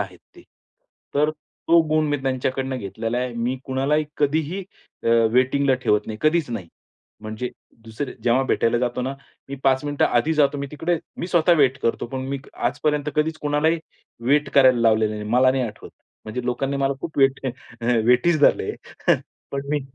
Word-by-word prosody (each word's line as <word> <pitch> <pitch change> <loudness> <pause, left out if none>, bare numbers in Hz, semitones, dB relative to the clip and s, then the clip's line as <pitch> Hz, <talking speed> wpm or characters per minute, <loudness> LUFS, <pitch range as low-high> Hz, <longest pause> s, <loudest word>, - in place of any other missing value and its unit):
आहेत 95 -3 -5 0.2
ते. - - -14 0.7
तर 150 +2 +3 0.4
तो 170 0 +7
गुण 155 0 +2
मी 145 - +1
त्यांच्याकडनं 130 0 -1
घेतलेला 115 +4 -3
आहे. 125 0 -2
मी 120 +3 -1
कुणालाही 140 +3 0
कधीही 155 +6 0 0.4
अ, - - +1 0.2
वेटिंगला 130 +2 +3
ठेवत 105 - +2
नाही 110 -1 -6
कधीच 155 -2 +2
नाही. 100 -8 -5 0.5
म्हणजे 110 +3 -4 0.4
दुसरे 115 +5 -5
जेव्हा 125 +2 +3
भेटायला 115 +1 +2
जातो 125 0 -1
ना, 135 +2 -3 0.3
मी 140 - -4
5 135 +1 +3
मिनिटं 145 -1 +1
आधी 120 +7 +2
जातो 145 -1 +2
मी 140 - -3
तिकडे 165 +3 -1 0.2
मी - - -3
स्वतः 175 -1 +3
वेट 130 -1 +3
करतो 115 - 0
पण 130 +2 -5
मी 140 - -2 0.2
आजपर्यंत 150 -1 -1
कधीच 155 +1 +1
कोणालाही 150 +3 +2 0.5
वेट 145 0 +3
करायला 130 -3 +6
लावलेलं 110 -1 +3
नाही, 105 0 -6
मला 130 +2 +5
नाही 130 0 0
आठवत. 110 -3 -8 0.3
म्हणजे 115 +3 -5
लोकांनी 135 +3 -1
मला 140 0 +1
खूप 160 - -6
वेट 135 0 +3
अ, - - 0 0.6
वेटीज 140 +6 +4
धरले - - +4
आहे, - - -1 0.4
पण 140 0 -3
मी 150 -1 +1
135 Hz, 175 wpm, -23 LUFS, 120-150 Hz, 0.7 s, तो